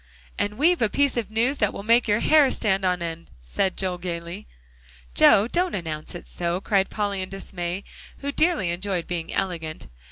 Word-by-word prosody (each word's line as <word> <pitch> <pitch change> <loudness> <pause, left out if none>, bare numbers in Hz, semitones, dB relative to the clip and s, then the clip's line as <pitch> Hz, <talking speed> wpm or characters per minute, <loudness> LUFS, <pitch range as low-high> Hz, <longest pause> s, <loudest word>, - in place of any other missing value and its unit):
"And 210 +1 -2
we've 335 +4 +3
a 225 - +3
piece 280 +3 +1
of 235 -4 -2
news 235 +6 0
that 210 -3 +2
will - - -6
make 230 +2 +4
your 210 +1 +2
hair 300 -3 +5
stand 195 -6 +1
on 180 -2 +1
end," 165 0 -6
said 185 - -1
Joel 185 -2 -2
gaily. 175 +2 -6 0.7
"Joe, 200 - +6
don't 355 +6 0
announce 160 -2 -5
it 175 - -9
so," 175 +1 -2
cried 195 -1 +1
Polly 205 -2 -2
in 185 - -5
dismay, 190 -1 -4 0.3
who 280 0 -4
dearly 310 - +1
enjoyed 180 0 -2
being 170 -2 -4
elegant. 165 -4 -3
195 Hz, 185 wpm, -24 LUFS, 175-225 Hz, 0.7 s, Joe